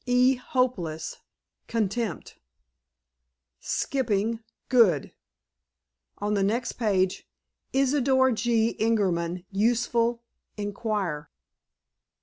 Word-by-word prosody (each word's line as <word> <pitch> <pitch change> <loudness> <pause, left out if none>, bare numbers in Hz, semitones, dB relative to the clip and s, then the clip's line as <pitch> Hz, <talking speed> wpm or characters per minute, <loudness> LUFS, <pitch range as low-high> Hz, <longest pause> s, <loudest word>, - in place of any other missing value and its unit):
"E. 250 +1 +5
hopeless. 245 -11 -2 0.5
Contempt." 225 -3 -2 1.2
"Skipping—good." 225 - 0 1.0
On 210 +1 -1
the 200 - +1
next 230 +5 0
page: 190 -5 0 0.4
"Isidor 265 -1 +3
G. 230 0 +1
Ingerman. 185 -5 0
Useful. 235 +2 +1 0.3
Inquire." 205 -7 -3
225 Hz, 65 wpm, -26 LUFS, 195-245 Hz, 1.2 s, E